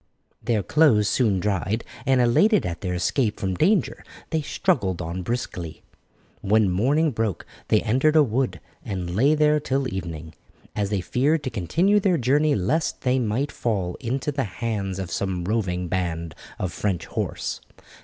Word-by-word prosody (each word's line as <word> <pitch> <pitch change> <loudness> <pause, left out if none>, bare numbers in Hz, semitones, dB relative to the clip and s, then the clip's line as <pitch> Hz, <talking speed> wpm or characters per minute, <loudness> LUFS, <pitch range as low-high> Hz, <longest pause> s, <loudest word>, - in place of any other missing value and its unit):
Their 110 -4 0
clothes 115 - +4
soon 105 -6 +2
dried, 105 +3 -1 0.2
and 135 -1 +4
elated 195 - +4
at 85 -1 -4
their 90 -2 -2
escape 110 +5 0
from 95 -1 -1
danger 185 - +1 0.3
they 160 -2 +1
struggled 125 - 0
on 85 +2 -4
briskly. 90 -6 -4 0.6
When 105 -1 +3
morning 145 - +2
broke 110 -6 -2 0.2
they 110 - +3
entered 130 +7 +2
a 155 - +7
wood, 120 - -1 0.2
and 90 -3 -4
lay 140 +8 +4
there 150 0 +3
till 135 -2 -1
evening, 85 -3 -6 0.4
as 100 -2 -1
they 100 -3 0
feared 140 - +1
to 130 - -3
continue 170 - +2
their 190 -3 +2
journey 145 +4 +2
lest 135 - -1
they 130 0 +2
might 125 +5 -1
fall 95 -7 -2
into 130 +5 -2
the 135 -2 -1
hands 100 -2 -3
of 95 -3 -5
some 95 -2 -2
roving 90 -3 -1
band 85 -2 -2 0.2
of 90 -3 -3
French 95 -3 -2
horse. - - -4
110 Hz, 160 wpm, -24 LUFS, 90-140 Hz, 0.6 s, a